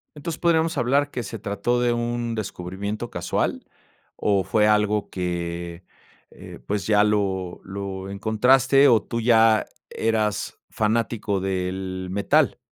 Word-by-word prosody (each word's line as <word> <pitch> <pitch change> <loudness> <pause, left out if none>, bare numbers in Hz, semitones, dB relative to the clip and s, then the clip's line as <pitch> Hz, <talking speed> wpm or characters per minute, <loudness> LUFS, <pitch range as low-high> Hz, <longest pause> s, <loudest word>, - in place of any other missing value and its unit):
Entonces, 160 +2 -5
¿podríamos 165 -2 +2
hablar 140 +3 +2
que 125 -4 -4
se 110 +2 -7
trató 100 +5 -1
de 120 -1 +2
un 120 0 -2
descubrimiento 100 +3 -5
casual, 85 - -2 0.5
o 100 -2 +1
fue 105 +3 +2
algo 105 -1 +2
que, 85 -1 -4 0.5
eh, - - -12
pues, 105 -1 -2
ya 105 -1 +4
lo 95 -4 -1
lo 95 0 -6
encontraste, 130 +7 +4
o 115 -4 +5
tú 115 +2 -4
ya 110 -1 +4 0.2
eras 110 -2 -1
fanático 110 -2 -1
del 95 0 -3
metal? 100 +1 +2
105 Hz, 125 wpm, -23 LUFS, 95-120 Hz, 0.5 s, o